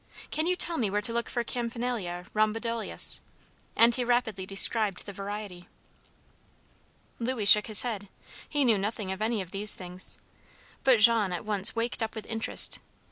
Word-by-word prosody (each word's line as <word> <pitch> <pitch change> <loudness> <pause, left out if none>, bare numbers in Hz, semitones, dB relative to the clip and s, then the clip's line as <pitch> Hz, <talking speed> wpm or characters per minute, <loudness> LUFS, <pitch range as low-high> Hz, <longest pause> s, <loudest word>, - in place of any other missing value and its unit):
Can 310 +2 -1
you 365 - +2
tell 345 -2 -2
me 220 -5 0
where 205 +2 0
to 230 - -1
look 235 0 -2
for 240 - -2
Campanila 235 -8 -4
rhomboidalis?" 225 +2 0 0.5
and 235 +1 +5
he 250 - +1
rapidly 225 -6 -1
described 200 0 +3
the 200 - -8
variety. 200 -2 -7 1.5
Louis 235 -2 -2
shook 210 +1 +7
his 215 -2 +3
head. 210 -5 -5 0.4
He 290 -2 +1
knew 225 -5 +3
nothing 205 -1 -3
of 190 +2 -6
any 220 -2 -1
of 180 - -16
these 205 +1 +2
things. 180 0 -7 0.7
But 260 -3 +5
Jean 220 -3 +6
at 175 +2 -5
once 205 -1 +2
waked 230 +1 -2
up 225 0 -3
with 220 - -7
interest. 225 0 +1
215 Hz, 165 wpm, -28 LUFS, 200-235 Hz, 1.5 s, shook